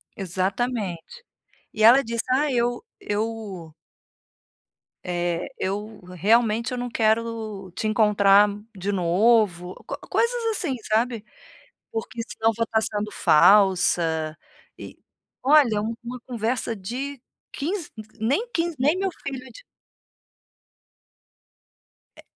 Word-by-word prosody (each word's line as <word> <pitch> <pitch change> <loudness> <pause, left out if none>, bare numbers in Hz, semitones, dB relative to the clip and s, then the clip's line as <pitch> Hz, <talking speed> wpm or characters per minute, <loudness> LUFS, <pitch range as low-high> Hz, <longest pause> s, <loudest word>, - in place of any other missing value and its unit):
Exatamente. 195 - -3 0.5
E 215 - -1
ela 250 +5 +8
disse: 230 0 -3
"Ah 285 +3 +2
eu 240 0 0 0.2
eu" 205 -6 -4 1.3
eh, 175 -1 -2
eu 205 +2 -4
realmente 225 +4 +2
eu 250 - -3
não 245 0 -3
quero 220 -4 -1
te 220 - -2
encontrar 210 -2 +5 0.3
de 195 +2 -3
novo, 185 0 +2
co - - -4
coisas 470 0 0
assim, 330 -10 -1
sabe? 225 0 0 0.7
"Porque 225 +1 -4
senão 225 0 0
vou 230 - 0
tá 220 0 +1
sendo 210 -1 -3
falsa". 170 -4 +3 0.4
E, - - -10 0.5
olha, 270 -6 +5
é - - +2
uma 235 +3 -6
conversa 235 -1 -2
de 250 +7 -6 0.3
15 340 +3 -4 0.3
nem 280 - 0
15, 335 -1 -1
nem 300 +7 +2
meu 385 0 0
filho 275 -1 -4
de - - -14 2.5
É. - - -15
225 Hz, 110 wpm, -24 LUFS, 195-245 Hz, 2.5 s, ela